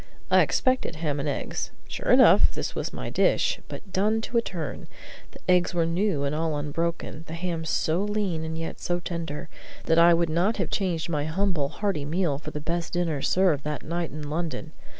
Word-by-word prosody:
I - - +7
expected 255 - +1
ham 150 -2 -2
and 140 +1 -1
eggs. 140 - -3 0.2
Sure - - -4
enough, - - +7
this - - -3
was - - -3
my - - -5
dish, - - +2
but 195 -2 -9
done 210 +4 +2
to 235 +2 -2
a - - +5
turn. 165 -9 -5 0.4
The - - -14
eggs 180 0 +3
were 170 -1 +3
new 165 -2 0
and 140 +1 0
all 160 -1 0
unbroken, 160 +2 -3
the 160 - -5
ham 165 -1 -3
so 160 +3 +1
lean 205 -6 -1
and 160 0 -4
yet 165 0 -5
so 175 0 -1
tender, 165 -4 -5 0.4
that 165 0 +4
I 170 0 +7
would 170 0 +1
not 180 +8 +2
have 190 -5 -1
exchanged 175 -5 -1
my 150 -3 0
humble, 165 -3 0
hearty 190 -3 -2
meal 155 -2 0
for 155 - -7
the 150 - -5
best 170 +2 -3
dinner 165 -5 0
served 175 -5 +2
that 150 -1 -3
night 170 +1 -2
in 150 -1 -6
London. 155 0 -3
165 Hz, 200 wpm, -26 LUFS, 155-180 Hz, 0.4 s, I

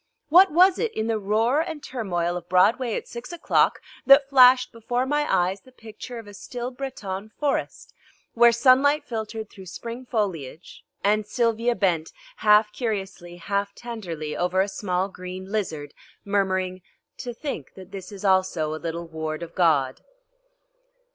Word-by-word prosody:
What 370 +5 +7
was 365 +4 +5
it 465 -1 0
in 220 - -1
the 225 -1 0
roar 225 +8 +2
and 320 -3 -6
turmoil 175 -8 -2
of 175 -1 -7
Broadway 220 +6 +3
at - - -5
six 235 +7 -8
o'clock 345 0 +2 0.3
that 275 0 +7
flashed 255 -2 +6
before 245 +2 -2
my 295 +2 0
eyes 185 +2 +1
the 255 - -19
picture 230 +1 -10
of 230 - -8
a 205 - -12
still 245 +4 -6
Breton 215 -7 -6
forest 290 -2 -2 0.4
where 235 0 +6
sunlight 265 +5 +4
filtered 220 -2 -5
through 190 -3 -12
spring 235 +7 -7
foliage 180 - -4 0.2
and 210 +1 +2
Sylvia 230 +1 +1
bent, 170 -6 0 0.2
half 210 0 +4
curiously, 195 -7 -4
half 200 +3 -3
tenderly, 175 -11 -6
over 180 +1 0
a 195 - 0
small 190 -2 -2
green 185 0 -8
lizard, 160 -9 -3 0.3
murmuring: 190 -2 0 0.4
"To 245 - -5
think 235 - -6
that 190 0 -12
this 195 0 -8
also 185 -5 +2
is 155 - -5
a - - -21
little 170 0 -4
ward 160 0 -5
of 170 0 -9
God!" 150 -7 +2
210 Hz, 155 wpm, -24 LUFS, 180-245 Hz, 0.4 s, What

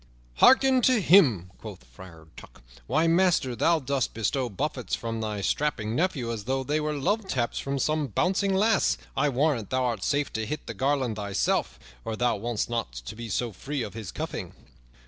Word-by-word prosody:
"Hearken 265 - +6
to 255 0 +4
him!" 135 - +4
quoth 105 - -10
Friar 80 +6 -14
Tuck. - - -14 0.2
"Why, 155 +2 +2
master, 165 -7 +2
thou 165 +7 +3
dost 140 -4 -2
bestow 120 +3 -1
buffets 130 +3 -3
from 115 -1 -4
thy 105 -2 -3
strapping 115 -3 -1
nephew 145 -8 0
as 110 -3 -5
though 135 +1 -1
they 150 +4 0
were 150 0 -2
love 205 +9 0
taps 120 -8 -1
from 140 0 -3
some 150 +2 0
bouncing 190 - +1
lass. 220 +3 +2 0.2
I 145 +2 +2
warrant 135 -5 0
thou 130 0 0
art 115 -6 -2
safe 145 0 0
to 110 0 -2
hit 150 - -5
the - - -6
garland 130 -5 0
thyself, 100 -2 -1 0.3
or 110 -1 -3
thou 120 0 +1
wouldst 115 +1 -2
not - - -4
be 115 0 -7
so 120 +3 -1
free 135 +7 -4
of 105 - -7
his 110 -4 -7
cuffing." - - -5
130 Hz, 185 wpm, -26 LUFS, 110-150 Hz, 0.3 s, Hearken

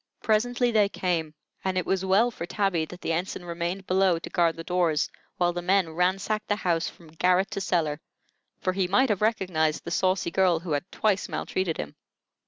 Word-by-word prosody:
Presently 240 +3 +2
they 210 -3 +4
came, 165 -6 -2 0.3
and 190 -1 -1
it 185 - 0
was 190 -1 0
well 200 +6 +3
for 170 -6 -6
Tabby 195 -5 0
that 180 +3 -11
the 165 - -1
ensign 175 +1 -3
remained 175 +3 -3
below 185 -2 +3
to 165 - -8
guard 170 -2 +2
the 165 - -7
doors 170 -4 +1 0.3
while 175 -1 +2
the 175 - -3
men 185 -1 +2
ransacked 195 +5 0
the 205 - +2
house 170 -5 0
from 165 -2 -17
garret 180 +4 +2
to 195 - -3
cellar; 160 -5 0 0.6
for 185 - 0
he 190 -1 0
might 255 +8 +3
have 210 -2 0
recognized 185 -8 +1
the 170 - -6
saucy 185 -1 +1
girl 180 -3 +3
who 170 -2 -6
had 150 +6 -2
twice 205 -2 0
maltreated 185 -4 -2
him. 75 - -6
180 Hz, 195 wpm, -26 LUFS, 170-195 Hz, 0.6 s, they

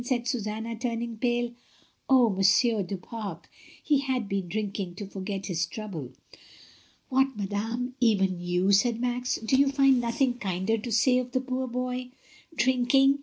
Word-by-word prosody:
said 245 -1 -1
Susanna, 225 -1 -3
turning 235 0 -3
pale. 240 +1 0 0.6
"Oh! 250 -4 +5
Mon 195 0 -2
sieur 220 +2 +4
du 195 +1 -4
Pare, 200 -3 -6 0.4
he 290 -3 +3
had 260 -5 -1
been 195 -2 -2
drinking 200 -2 -3
to 205 - -6
forget 195 0 -5
his 175 -2 -1
trouble!" 165 - -6 1.0
"What, 265 -2 +2
madame, 225 +5 -2
even 195 -7 +2
you," 180 +2 +1
said 225 +3 +3
Max, 250 0 -1
"do 225 +4 0
you 275 +1 +4
find 275 -2 +4
nothing 245 +1 0
kinder 195 +3 -1
to 235 +2 -6
say 250 +3 +4
of 250 0 -5
the 255 - +2
poor 260 0 -3
boy? 250 0 -3 0.5
Drink 255 -1 +2
ing 270 +1 +5
230 Hz, 165 wpm, -27 LUFS, 200-250 Hz, 1.0 s, Oh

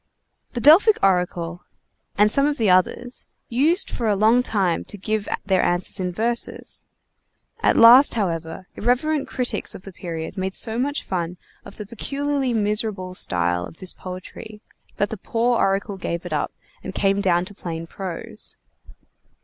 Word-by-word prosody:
The 240 - -2
Delphic 360 - +7
oracle, 180 -2 0 0.5
and 210 +1 +5
some 275 +4 +4
of 295 0 -1
the 215 -6 +3
others, 235 +7 +1 0.2
used 300 +10 +2
for 230 - -2
a 210 - +3
long 220 +5 +4
time 195 -8 0
to 205 - -8
give 215 +1 -2 0.2
their 190 -2 +2
answers 175 +2 0
in 180 -1 -1
verses. 235 +5 -1 0.7
At - - +2
last, 240 +5 +8
however, 170 -3 -3
irreverent 270 +6 0
critics 245 -4 -2
of 185 - -10
the 195 - -9
period 165 0 -6
made 190 0 -2
so 225 0 -1
much 285 +3 -1
fun 180 -1 -3 0.3
of - - -12
the 210 - -6
peculiarly 275 +4 -2
miserable 210 -4 -1
style 90 - 0
of 130 - -10
this 185 -2 -3
poetry, 185 +3 -9 0.4
that 205 - 0
the 220 - -4
poor 235 +4 0
oracle 195 +1 0
gave 170 -1 -4
it 175 - -4
up 150 - -1 0.3
and 190 - -7
came 195 0 +2
down 175 -2 +2
to 205 - -10
plain 165 -4 -6
prose. 195 +5 -6
200 Hz, 160 wpm, -22 LUFS, 180-235 Hz, 0.7 s, last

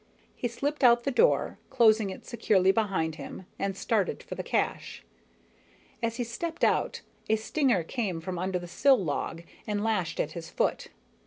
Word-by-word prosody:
He 245 - -2
slipped 280 +5 -3
out 240 -1 +6
the 275 - 0
door, 485 - +2
closing 220 -5 +4
it 190 - -8
securely 200 -5 +3
behind 190 -7 0
him, 185 - -8
and 195 -1 -2
started 205 -4 0
for - - -7
the - - -4
cache. - - -2 1.0
As 230 -1 -1
he 245 - -1
stepped 325 +8 -5
out, - - +2 0.3
a 220 - +5
stinger 220 - +1
came 195 -3 -2
from 180 +1 -5
under 185 0 -1
the 175 0 -7
sill 265 +9 +4
log 165 -2 -3 0.2
and 205 -1 -1
lashed 210 -7 -1
at 155 - 0
his 165 0 -7
foot. - - -1
215 Hz, 170 wpm, -28 LUFS, 180-240 Hz, 1.0 s, out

